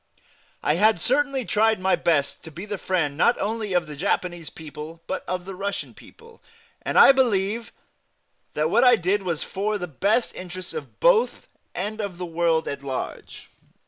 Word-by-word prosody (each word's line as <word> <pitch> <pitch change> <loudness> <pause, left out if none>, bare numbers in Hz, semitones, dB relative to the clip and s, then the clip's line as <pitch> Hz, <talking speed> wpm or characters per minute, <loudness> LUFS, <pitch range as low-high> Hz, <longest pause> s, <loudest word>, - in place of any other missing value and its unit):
I 150 - +2
had 215 0 +4
certainly 275 - +1
tried 220 0 +2
my 190 +1 +2
best 145 -5 0
to - - -8
be 175 +6 -8
the 205 -2 -5
friend 165 -7 0
not 235 +10 +3
only 215 -1 -2
of 175 -1 +2
the 150 -1 -8
Japanese 175 0 -2
people 155 +1 -9
but - - -4
of 180 0 -3
the 195 - -6
Russian 200 +2 -4
people, 460 0 -17 0.4
and - - -2
I - - +10
believe 230 -4 +1 0.8
that 155 +2 0
what 235 +3 +4
I 250 -1 +7
did 195 +1 0
was 170 -5 -2
for 210 +2 -2
the 180 - -4
best 200 - 0
interests 185 0 -7
of 465 - -8
both - - +3 0.3
and 210 +4 -3
of 200 -4 -5
the 180 - -4
world 165 -1 +1
at 140 0 -4
large. 135 -2 -6
190 Hz, 175 wpm, -24 LUFS, 165-220 Hz, 0.8 s, I